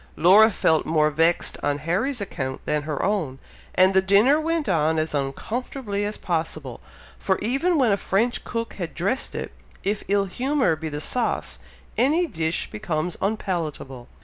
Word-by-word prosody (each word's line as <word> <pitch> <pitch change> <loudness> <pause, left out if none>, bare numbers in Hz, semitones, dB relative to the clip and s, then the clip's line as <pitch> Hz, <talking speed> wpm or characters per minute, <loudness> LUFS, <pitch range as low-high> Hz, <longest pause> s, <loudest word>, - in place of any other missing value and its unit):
Laura 200 +7 +7
felt 160 -6 +2
more 155 -1 +3
vexed 165 +3 +1
on 145 0 0
Harry's 195 - -1
account 130 -9 -4
than 150 0 0
her 150 -1 -3
own, 175 -10 -1 0.4
and 185 +1 +5
the 190 - +5
dinner 210 +11 +4
went 325 -1 -1
on 160 -3 +2
as 155 0 -1
uncomfortably 205 - -3
as 210 +1 -3
possible; 160 - -3 0.4
for 190 - +1
even 275 - +1
when 250 -6 +3
a 200 - +3
French 225 +5 0
cook 230 -1 -4
has 175 -4 -4
dressed 200 +11 -1
it, - - -4 0.3
if 205 +1 -1
ill 200 0 +2
humour 255 - +1
be 160 +1 -5
the 145 0 -4
sauce, 235 +9 -1 0.4
any 310 +8 +3
dish 165 - -2
becomes 175 -5 -2
unpalatable. 165 - -3
190 Hz, 160 wpm, -24 LUFS, 155-230 Hz, 0.4 s, Laura